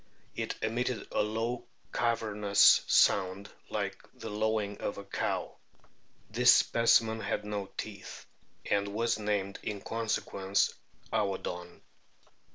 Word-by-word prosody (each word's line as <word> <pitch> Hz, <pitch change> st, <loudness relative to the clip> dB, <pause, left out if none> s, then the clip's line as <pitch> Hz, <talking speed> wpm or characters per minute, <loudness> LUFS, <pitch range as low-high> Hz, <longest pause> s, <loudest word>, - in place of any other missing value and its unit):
"It -, -, -3 dB
emitted 120 Hz, +2 st, -1 dB
a -, -, +1 dB
low 115 Hz, +3 st, -2 dB, 0.3 s
cavernous 105 Hz, -4 st, +4 dB
sound 95 Hz, +1 st, +3 dB, 0.2 s
like -, -, -3 dB
the 110 Hz, -, -7 dB
lowing 105 Hz, -1 st, -1 dB
of -, -, -3 dB
a 100 Hz, -, -6 dB
cow." -, -, -3 dB, 0.8 s
This -, -, +6 dB
specimen 115 Hz, -1 st, +4 dB
had 105 Hz, -, -2 dB
no 105 Hz, -2 st, -4 dB
teeth, 100 Hz, -2 st, -7 dB, 0.4 s
and 100 Hz, 0 st, 0 dB
was 115 Hz, 0 st, +1 dB
named 105 Hz, -2 st, -2 dB
in 105 Hz, -2 st, -4 dB
conse 115 Hz, +2 st, -1 dB
quence 95 Hz, 0 st, 0 dB, 0.4 s
Aodon. 90 Hz, -3 st, -2 dB
105 Hz, 115 wpm, -30 LUFS, 100-110 Hz, 0.8 s, This